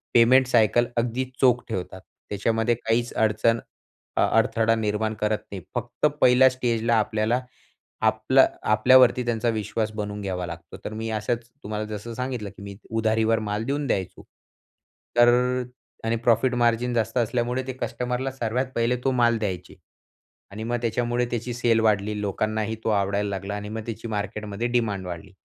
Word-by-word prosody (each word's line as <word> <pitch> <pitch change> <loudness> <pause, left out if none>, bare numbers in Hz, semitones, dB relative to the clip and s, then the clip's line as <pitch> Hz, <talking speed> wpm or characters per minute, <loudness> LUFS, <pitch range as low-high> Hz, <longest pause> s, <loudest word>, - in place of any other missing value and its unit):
Payment 125 +3 +6
cycle 120 0 +3
अगदी 120 +2 0 0.2
चोख 125 -2 +4
ठेवतात. 95 -2 -5 0.3
त्याच्यामध्ये 115 +3 +1
काहीच 115 +1 -1
अडचण 110 +1 +2 0.6
अ - - +4
अडथळा 115 0 +3
निर्माण 110 0 -1
करत 105 0 +1
नाहीत. 95 -3 -6
फक्त - - -2 0.2
पहिल्या 125 +1 +7
स्टेजला 120 -2 0
आपल्याला 110 +2 +1 0.6
आपला - - +4 0.3
आपल्यावरती 125 +3 +5
त्यांचा 120 0 0
विश्वास 110 0 -2
बनवून 105 -1 -4
घ्यावा 90 -2 -3
लागतो. 85 0 -9
तर 110 - -4
मी 110 +1 -4
असच 115 +2 -2 0.2
तुम्हाला 105 +1 -3
जसं 105 +2 -6
सांगितलं 125 -4 -3
की - - -11
मी 100 0 -8
उधारीवर 110 0 +1
माल 105 0 -2
देऊन 140 +1 -1
द्यायचो, 95 -5 -2 0.9
तर 120 0 +7 0.8
आणि 115 +1 +1
प्रॉफिट 120 +2 +2
मार्जिन 120 0 +1
जास्त 115 0 -1
असल्यामुळे 120 +2 0
ते 130 - -3
कस्टमरला 125 +2 -2
सर्वात 125 0 -1
पहिले 115 +1 +1
तो 135 - +3
माल 120 -2 +3
द्यायचे. 90 -5 -4 0.8
आणि 105 +2 -6
मग 120 +1 -1
त्याच्यामुळे 120 +1 0
त्याची 120 +1 -3
सेल 120 -2 +2
वाढली 105 -1 +1
लोकांनाही 110 +2 -1
तो - - +2
आवडायला 100 0 +1
लागला. 100 +1 -4
आणि 105 0 -6
मग 110 +1 -4
त्याची 115 0 -6
मार्केटमध्ये 105 +1 -3
डिमांड 110 -6 -1
वाढली. 85 -2 -7
115 Hz, 155 wpm, -25 LUFS, 105-120 Hz, 0.9 s, पहिल्या